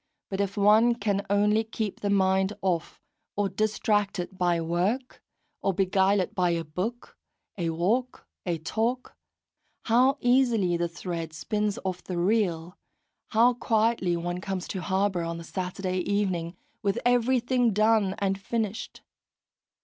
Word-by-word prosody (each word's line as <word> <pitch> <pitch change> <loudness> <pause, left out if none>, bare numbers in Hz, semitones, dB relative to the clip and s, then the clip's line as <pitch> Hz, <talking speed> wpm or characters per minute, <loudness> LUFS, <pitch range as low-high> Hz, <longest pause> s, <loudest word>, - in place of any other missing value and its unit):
But 195 +1 -1
if 200 +1 -2
one 215 +4 +5
can 200 -3 -1
only 210 +2 +3
keep 220 -2 -4
the 205 - -2
mind 190 0 +2
off, 175 -4 -1 0.4
or 205 -1 0
distract 210 0 0
it 180 +2 -5
by 175 -2 +1
work, 180 +10 -1 0.4
or 195 - 0
beguile 195 +1 +3
it 185 - -4
by 180 -2 +1
a 170 -1 0
book, 185 +10 -5 0.4
a 170 -4 -2
walk, 210 +10 -1 0.2
a 175 -2 -1
talk, 225 - -2 0.7
how 255 +4 +3
easily 240 -8 +3
the 170 0 0
thread 170 -2 -5
spins 210 +6 -2
off 185 -1 -3
the 180 - -4
reel, 180 -3 0 0.5
how 235 +3 +4
quietly 220 -6 +1
one 175 +1 -3
comes 190 -2 -4
to 190 - -3
harbour 190 -1 0
on 170 0 -3
the 170 - -8
Saturday 185 +1 -3
evening, 180 -3 -1 0.2
with 200 +1 0
everything 245 0 +2
done 215 -1 +3
and 195 -2 -1
finished! 225 +1 -3
195 Hz, 140 wpm, -27 LUFS, 180-220 Hz, 0.7 s, one